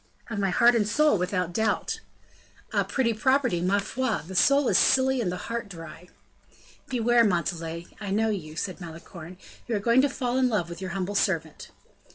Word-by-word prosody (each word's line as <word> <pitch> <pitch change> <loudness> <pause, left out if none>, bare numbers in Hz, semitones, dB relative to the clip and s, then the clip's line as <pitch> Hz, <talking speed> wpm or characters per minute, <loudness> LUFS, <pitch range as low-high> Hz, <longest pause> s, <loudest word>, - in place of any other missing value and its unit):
"Of 210 - -3
my 195 -1 +1
heart 235 +6 +5
and 220 -3 +1
soul, 300 +4 +3
without 180 -1 -1
doubt." 220 - -1 0.7
"A - - +2
pretty 240 -4 0
property! 250 -4 +1
ma 185 +3 +2
foi! 225 +3 -2
The 190 - -9
soul 275 +8 +4
is - - +4
silly 265 -1 +3
and 185 -6 -1
the 180 - -4
heart 230 +1 -5
dry." 165 -1 -10 0.8
"Beware, 240 -2 +3
Montalais, 170 -3 -1
I 205 -2 -5
know 220 +3 +1
you," 155 -7 -5
said 185 +3 -4
Malicorne; 170 +1 -10 0.3
"you 235 - -1
are - - 0
going 235 +5 +4
to 285 - +2
fall 255 -1 -1
in 255 -1 +3
love 205 -7 -1
with 170 +2 -8
your 185 - -4
humble 190 +1 -3
servant." 165 -6 -1
205 Hz, 190 wpm, -26 LUFS, 180-240 Hz, 0.8 s, heart